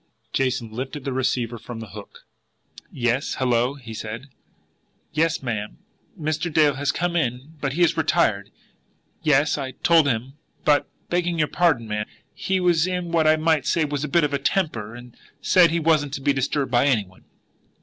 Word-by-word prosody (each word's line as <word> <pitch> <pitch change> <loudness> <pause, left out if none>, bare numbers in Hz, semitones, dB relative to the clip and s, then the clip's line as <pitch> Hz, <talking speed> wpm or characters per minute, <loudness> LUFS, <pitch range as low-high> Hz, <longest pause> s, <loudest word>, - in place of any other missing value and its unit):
Jason 130 -4 0
lifted 130 +5 -5
the 135 - -2
receiver 125 -2 -1
from 120 0 -8
the 110 -2 -8
hook. 100 +2 -12 0.7
"Yes 120 +3 -1
hello!" 125 +1 +1
he 120 -5 -10
said. 110 +5 -6 0.8
"Yes, 165 -1 +1
ma'am, 105 -4 -4 0.4
Mr. 155 +2 -2
Dale 150 -2 +4
has 140 +1 0
come 175 0 -2
in, 130 -1 -2
but 135 -2 -1
he 170 - -1
has 170 - +3
retired.... 130 -11 +1 0.7
Yes, 150 0 +2
I 130 -2 -4
told 165 -3 +5
him; 125 +1 -1 0.3
but, 145 -1 +3 0.2
begging 175 -1 0
your 150 -2 +1
pardon, 155 -10 +2
ma'am, 105 0 -3 0.3
he 190 0 -1
was 175 -2 +3
in 180 -2 -3
what 160 -2 +3
I 155 - +6
might 155 -3 +1
say 160 +1 +2
was 145 -1 -3
a - - -1
bit 165 +4 +3
of 145 -1 0
a 140 - +1
temper, 130 - -1
and 120 0 -12 0.2
said 180 -3 +5
he 170 - 0
wasn't 155 -3 +2
to 135 - -6
be 140 +1 +2
disturbed 135 0 -1
by 125 +3 +3
any 115 -7 +2
one." 95 0 -21
140 Hz, 180 wpm, -23 LUFS, 120-160 Hz, 0.8 s, I